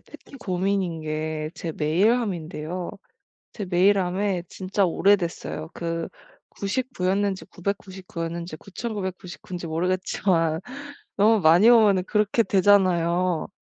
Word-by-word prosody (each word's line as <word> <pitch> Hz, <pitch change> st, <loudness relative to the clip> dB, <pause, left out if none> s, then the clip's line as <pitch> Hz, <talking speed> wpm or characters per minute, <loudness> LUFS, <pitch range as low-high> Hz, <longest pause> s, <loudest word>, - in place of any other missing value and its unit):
특히 -, -, -16 dB
고민인게 160 Hz, -6 st, -2 dB
제 165 Hz, -2 st, -5 dB
메일함인데요. 175 Hz, -1 st, 0 dB, 0.6 s
제 210 Hz, -, -5 dB
메일함에 185 Hz, 0 st, +2 dB
진짜 195 Hz, +1 st, -1 dB
오래됐어요. 175 Hz, -3 st, 0 dB
그 165 Hz, -1 st, -3 dB, 0.4 s
99 205 Hz, -1 st, -3 dB
였는지 195 Hz, 0 st, 0 dB
999 190 Hz, -2 st, -5 dB
였는지 170 Hz, 0 st, -5 dB
9999 190 Hz, -3 st, -6 dB
인지 175 Hz, -1 st, -5 dB
모르겠지만 165 Hz, -1 st, 0 dB, 0.6 s
너무 215 Hz, +2 st, +4 dB
많이 175 Hz, +7 st, +6 dB
오면은 210 Hz, -6 st, +5 dB
그렇게 210 Hz, +3 st, +2 dB
되잖아요. 180 Hz, -4 st, +2 dB
185 Hz, 235 characters per minute, -24 LUFS, 170-200 Hz, 0.6 s, 많이